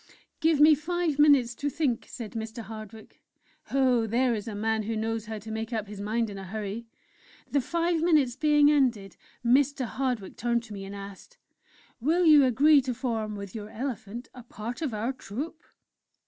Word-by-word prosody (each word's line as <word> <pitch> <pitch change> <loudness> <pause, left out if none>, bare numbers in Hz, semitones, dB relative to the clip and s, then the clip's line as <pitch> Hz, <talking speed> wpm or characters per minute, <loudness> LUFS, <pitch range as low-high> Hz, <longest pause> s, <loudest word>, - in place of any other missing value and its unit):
"'Give 320 -2 +3
me 305 +1 +8
five 320 0 -1
minutes 280 -5 +5
to 285 +4 -2
think,' 270 -5 -1
said 230 -4 -7
Mr. 225 0 -6
Hardwick. 215 0 -11 0.5
Oh! 255 -4 +2
there 240 +3 +2
is 215 0 -4
a 215 - -5
man 220 +1 0
who 220 +2 -3
knows 225 0 -2
how 220 -1 -4
to 220 +1 -8
make 220 +2 -4
up 220 -3 -2
his 205 -1 -8
mind 225 +3 0
in 200 - -7
a - - -7
hurry! 210 +3 -5 0.6
The 285 - +2
five 335 +4 0
minutes 300 -8 +3
being 295 0 +4
ended, 240 -10 +1 0.3
Mr. 270 +2 +3
Hardwick 245 -5 -3
turned 235 -1 0
to 220 -2 -10
me 195 -1 -6
and 195 +1 -8
asked: 200 - -10 0.6
"'Will 330 +8 +2
you 300 -3 +8
agree 280 +4 +5
to 255 -2 -3
form, 225 -4 -2
with 200 -2 -7
your 210 -1 -7
elephant, 235 -1 -5
a 250 - -10
part 235 +2 -7
of 300 -5 -1
our 225 +4 -2
Troupe?' 285 - -7
235 Hz, 185 wpm, -27 LUFS, 215-285 Hz, 0.6 s, me